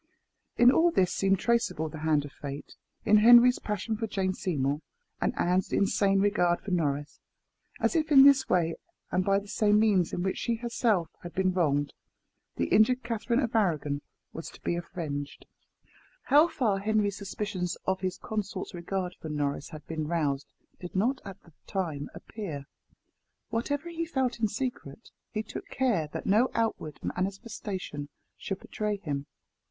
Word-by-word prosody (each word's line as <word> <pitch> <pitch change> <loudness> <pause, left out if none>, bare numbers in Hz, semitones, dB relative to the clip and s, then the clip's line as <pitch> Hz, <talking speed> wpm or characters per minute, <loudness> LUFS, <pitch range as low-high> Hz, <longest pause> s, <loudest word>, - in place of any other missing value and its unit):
In 240 +1 +7
all 335 +5 +4
this 190 - +2
seemed 195 0 +2
traceable 230 -7 +1
the 155 0 -8
hand 155 -2 +2
of 145 - -9
fate 140 0 -8 0.3
in 210 - +6
Henry's 240 +3 +7
passion 210 +1 -2
for 225 +1 -3
Jane 190 -2 -1
Seymour, 145 -6 -1 0.4
and - - +2
Anne's 180 +1 +1
insane 195 0 +2
regard 180 -4 +2
for 200 - -7
Norris 145 -4 -1 0.6
as - - +1
if 315 -1 +1
in 270 -2 +9
this 275 -1 +6
way, 165 -2 +2 0.4
and 185 - +2
by 195 +1 +3
the 200 +1 -5
same 210 0 +3
means 200 -6 +3
in 175 - -2
which 190 - -1
she 235 - 0
herself 225 -7 0
had 175 - -9
been 185 -1 +2
wronged, 145 -5 +1 0.6
the 85 - 0
injured 250 +4 +4
Catherine 235 +1 0
of 235 -2 -2
Arragon 150 -9 +1 0.3
was 165 - -6
to - - -15
be - - 0
avenged. 155 -5 -5 0.8
How 295 +4 +6
far 220 -11 0
Henry's 205 -1 +1
suspicions 195 -3 -3
of 190 0 0
his 185 -1 -2
consort's 205 -3 -4
regard 180 +1 -3
for 160 - -6
Norris 145 -1 -2
had 155 -2 -10
been 155 -2 -3
roused 145 -4 -1 0.3
did 180 0 -8
not 245 +8 +1
at 195 - -10
the 170 - -20
time 160 -7 -3
appear. 165 -11 -7 0.8
Whatever 285 +8 -2
he 335 0 -3
felt 260 -6 -1
in 220 - +2
secret, 225 - -5 0.2
he 215 0 -3
took - - -8
care 235 -12 0
that - - -5
no 220 +6 +4
outward 220 -10 -1
manifestation 190 - -4 0.3
should 195 -1 -5
betray 210 -1 -2
him. 145 -7 -4
195 Hz, 165 wpm, -29 LUFS, 165-225 Hz, 0.8 s, in